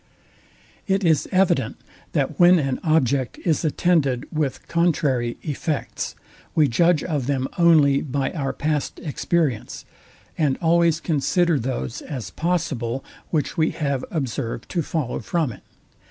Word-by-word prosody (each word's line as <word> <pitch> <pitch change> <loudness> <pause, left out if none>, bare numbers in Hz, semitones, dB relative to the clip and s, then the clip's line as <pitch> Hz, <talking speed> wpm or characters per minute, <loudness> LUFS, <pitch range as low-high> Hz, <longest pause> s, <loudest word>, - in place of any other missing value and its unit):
It 195 0 +1
is 160 -4 +2
evident, 190 0 +2 0.4
that - - -1
when 175 +1 +7
an 135 -5 -1
object 140 -5 +1
is 165 -2 +1
attended 150 -5 +1
with 150 -4 -2
contrary 145 -8 +1
effects, 150 0 -3 0.4
we 155 -2 +5
judge 165 +5 +3
of 145 -7 -2
them 135 -2 0
only 150 -5 +5
by 140 -1 -2
our 140 -5 -2
past 150 -1 -2
experience, 150 -5 -1 0.5
and 145 -4 +2
always 170 -1 +3
consider 170 +1 +1
those 125 -1 -3
as 125 - -6
possible, 140 -8 -2 0.2
which 155 -3 -1
we 160 -1 +3
have 140 -5 -1
observed 130 -5 -3
to 175 - 0
follow 150 -5 -2
from 165 -7 -1
it. - - -12
150 Hz, 130 wpm, -23 LUFS, 135-170 Hz, 0.5 s, when